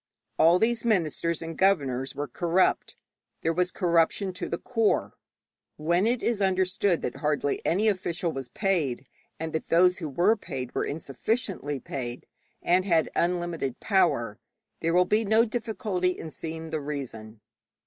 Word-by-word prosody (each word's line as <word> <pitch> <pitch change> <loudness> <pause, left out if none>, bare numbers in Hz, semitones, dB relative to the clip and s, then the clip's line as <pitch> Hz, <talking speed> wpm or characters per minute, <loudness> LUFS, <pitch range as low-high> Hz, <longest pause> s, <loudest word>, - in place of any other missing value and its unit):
All 170 +2 +6
these 225 +3 +1
ministers 170 -6 0
and 165 0 -6
governors 140 -10 +1
were 145 0 -3
corrupt; 175 +7 +1 0.5
there 165 - +2
was 180 +1 0
corruption 175 +2 +1
to 180 - -4
the 170 - -1
core. 225 -1 0 0.6
When 170 +6 +2
it 240 +1 0
is 230 -3 0
understood 190 -1 +1
that 125 - -3
hardly 150 -1 -1
any 200 +6 +2
official 180 -4 0
was 135 -4 -6
paid, 150 - -1 0.3
and 160 0 -4
that 160 - -3
those 180 +2 +4
who 160 -4 -4
were 180 +10 +3
paid 130 - -6
were - - 0
insufficiently 145 - -2
paid, 120 -2 -6 0.4
and 180 +2 +3
had 170 -4 +2
unlimited 170 -6 -1
power, 170 - +1 0.4
there 165 +1 0
will 180 0 +5
be 215 +4 +2
no 220 +2 +4
difficulty 215 -5 -1
in 160 - -7
seeing 160 0 -6
the 155 -2 -2
reason. 120 -7 -6
170 Hz, 150 wpm, -27 LUFS, 150-195 Hz, 0.6 s, All